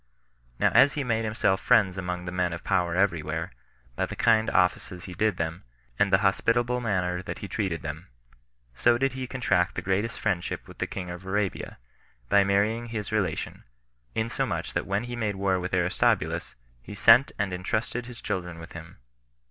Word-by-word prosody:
Now -, -, +3 dB
as 140 Hz, -, +6 dB
he 145 Hz, -, -1 dB
made 115 Hz, -3 st, 0 dB
himself 105 Hz, -3 st, +1 dB
friends 105 Hz, -7 st, +4 dB
among 90 Hz, -2 st, -4 dB
the 90 Hz, -, -4 dB
men 90 Hz, -1 st, 0 dB
of 85 Hz, -, -7 dB
power 90 Hz, -3 st, +1 dB
every 90 Hz, -4 st, +2 dB
where, 80 Hz, +3 st, -4 dB, 0.4 s
by -, -, -1 dB
the -, -, -7 dB
kind 110 Hz, -1 st, +3 dB
offices 90 Hz, 0 st, +1 dB
he 90 Hz, -, -8 dB
did 105 Hz, +1 st, +1 dB
them, 80 Hz, +2 st, -3 dB, 0.4 s
and 100 Hz, -, +3 dB
the 95 Hz, -, +6 dB
hospitable 120 Hz, +5 st, +2 dB
manner 90 Hz, -5 st, 0 dB
that -, -, -6 dB
he -, -, -7 dB
treated 95 Hz, -7 st, -2 dB
them; 80 Hz, +3 st, -6 dB, 0.7 s
so 120 Hz, -, +3 dB
did 135 Hz, 0 st, 0 dB
he 130 Hz, -1 st, -4 dB
contract 100 Hz, -9 st, +1 dB
the 90 Hz, -, -3 dB
greatest 100 Hz, +5 st, -1 dB
friendship 95 Hz, -5 st, -2 dB
with -, -, -14 dB
the -, -, -1 dB
king 90 Hz, -2 st, -5 dB
of 90 Hz, +1 st, -8 dB
Arabia, 100 Hz, 0 st, -2 dB, 0.5 s
by 100 Hz, -, +5 dB
marrying 105 Hz, +4 st, +1 dB
his 110 Hz, -2 st, -4 dB
relation; 95 Hz, -7 st, -2 dB, 0.5 s
insomuch 115 Hz, +1 st, -1 dB
that -, -, -2 dB
when 100 Hz, +3 st, 0 dB
he 120 Hz, 0 st, -5 dB
made 110 Hz, -4 st, -1 dB
war 95 Hz, -1 st, +1 dB
with 90 Hz, 0 st, -4 dB
Aristobulus, 90 Hz, -1 st, +1 dB, 0.3 s
he 100 Hz, -, -9 dB
sent 115 Hz, +6 st, +6 dB
and 100 Hz, -3 st, -1 dB
intrusted 110 Hz, +6 st, -2 dB
his 120 Hz, -2 st, -9 dB
children 90 Hz, -2 st, -3 dB
with 85 Hz, 0 st, -10 dB
him. 85 Hz, 0 st, -10 dB
95 Hz, 185 wpm, -27 LUFS, 90-110 Hz, 0.7 s, as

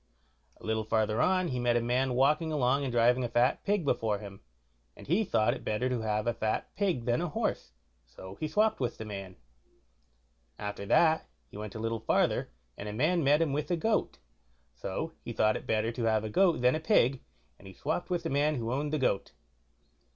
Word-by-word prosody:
A -, -, -13 dB
little 110 Hz, 0 st, 0 dB
farther 110 Hz, 0 st, +1 dB
on 185 Hz, -1 st, +2 dB
he 125 Hz, -, -2 dB
met 120 Hz, -1 st, +2 dB
a -, -, +4 dB
man 125 Hz, +2 st, 0 dB
walking 150 Hz, +5 st, +2 dB
along 140 Hz, -2 st, +2 dB
and 135 Hz, -, -2 dB
driving 120 Hz, +2 st, +3 dB
a 120 Hz, -, -2 dB
fat 120 Hz, +3 st, +2 dB
pig 205 Hz, -5 st, 0 dB
before 115 Hz, -6 st, +1 dB
him, 100 Hz, -1 st, -10 dB, 0.6 s
and -, -, -12 dB
he 180 Hz, +9 st, +2 dB
thought 110 Hz, -, +2 dB
it -, -, -8 dB
better 110 Hz, +4 st, -1 dB
to 125 Hz, -3 st, -1 dB
have 105 Hz, -1 st, -1 dB
a 120 Hz, -, +1 dB
fat 110 Hz, -1 st, -2 dB
pig 185 Hz, -, 0 dB
than 120 Hz, +4 st, +1 dB
a 175 Hz, -, -1 dB
horse, -, -, -2 dB, 0.4 s
so 95 Hz, +10 st, -11 dB
he 155 Hz, -, -1 dB
swopped 215 Hz, +6 st, +2 dB
with 125 Hz, -3 st, -2 dB
the 110 Hz, -, -6 dB
man. 100 Hz, -3 st, -7 dB, 1.2 s
After 100 Hz, -1 st, -5 dB
that 160 Hz, +5 st, +3 dB, 0.2 s
he -, -, -10 dB
went 105 Hz, 0 st, -7 dB
a -, -, -5 dB
little 115 Hz, 0 st, -2 dB
farther, 110 Hz, -, +1 dB, 0.3 s
and 105 Hz, -, -6 dB
a -, -, -5 dB
man 160 Hz, +9 st, +1 dB
met 145 Hz, +4 st, +4 dB
him 145 Hz, -4 st, -1 dB
with 150 Hz, +1 st, -2 dB
a 175 Hz, -, +1 dB
goat; 215 Hz, +6 st, 0 dB, 0.6 s
so 95 Hz, -, -4 dB
he 120 Hz, -, -5 dB
thought 110 Hz, -1 st, +2 dB
it -, -, -6 dB
better 110 Hz, +1 st, +1 dB
to 120 Hz, 0 st, -3 dB
have 110 Hz, -1 st, +2 dB
a 110 Hz, -, -3 dB
goat 175 Hz, -, +3 dB
than 125 Hz, +1 st, +4 dB
a 155 Hz, -, -1 dB
pig, 140 Hz, -, +2 dB, 0.4 s
and 95 Hz, -, -13 dB
he 95 Hz, -, -11 dB
swopped 160 Hz, +4 st, -3 dB
with 175 Hz, -1 st, -1 dB
the -, -, -3 dB
man 145 Hz, 0 st, +1 dB
that 115 Hz, -, -4 dB
owned 145 Hz, +3 st, -1 dB
the 155 Hz, -, +1 dB
goat. 125 Hz, -8 st, 0 dB
125 Hz, 215 wpm, -30 LUFS, 110-155 Hz, 1.2 s, a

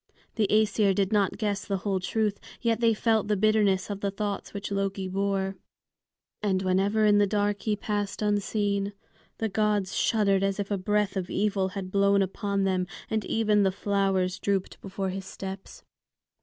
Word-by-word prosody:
The 215 Hz, -3 st, +1 dB
Æsir 210 Hz, -2 st, +3 dB
did 195 Hz, +2 st, +1 dB
not 200 Hz, -2 st, +2 dB
guess 205 Hz, -3 st, -1 dB
the 195 Hz, -, -2 dB
whole 195 Hz, 0 st, -1 dB
truth, 210 Hz, +2 st, -1 dB, 0.2 s
yet 230 Hz, -2 st, +1 dB
they 230 Hz, -2 st, +3 dB
felt 220 Hz, -1 st, +1 dB
the 210 Hz, -1 st, +1 dB
bitterness 205 Hz, -2 st, +3 dB
of 200 Hz, -, -4 dB
the 200 Hz, -, -1 dB
thoughts 200 Hz, 0 st, -4 dB
which 200 Hz, 0 st, -6 dB
Loki 195 Hz, -1 st, -1 dB
bore; 195 Hz, 0 st, -1 dB, 0.8 s
and 190 Hz, -2 st, 0 dB
whenever 195 Hz, +4 st, +2 dB
in 205 Hz, -1 st, +5 dB
the 205 Hz, -, +4 dB
dark 205 Hz, 0 st, 0 dB
he 215 Hz, -2 st, 0 dB
passed 205 Hz, 0 st, -3 dB
unseen, 205 Hz, -1 st, 0 dB, 0.4 s
the 225 Hz, -, -1 dB
gods 210 Hz, -2 st, 0 dB
shuddered 200 Hz, -3 st, +2 dB
as 195 Hz, 0 st, 0 dB
if 200 Hz, 0 st, -3 dB
a 200 Hz, -, +1 dB
breath 205 Hz, +1 st, 0 dB
of 185 Hz, -1 st, -3 dB
evil 200 Hz, -1 st, 0 dB
had 185 Hz, -1 st, -5 dB
blown 200 Hz, 0 st, +4 dB
upon 200 Hz, +1 st, -2 dB
them, 185 Hz, -1 st, 0 dB, 0.2 s
and 220 Hz, -1 st, 0 dB
even 215 Hz, -2 st, +2 dB
the 190 Hz, -1 st, +3 dB
flowers 195 Hz, -2 st, 0 dB
drooped 195 Hz, -2 st, -2 dB
before 195 Hz, 0 st, -3 dB
his 190 Hz, 0 st, -5 dB
steps. 190 Hz, 0 st, -8 dB
200 Hz, 175 wpm, -27 LUFS, 195-210 Hz, 0.8 s, in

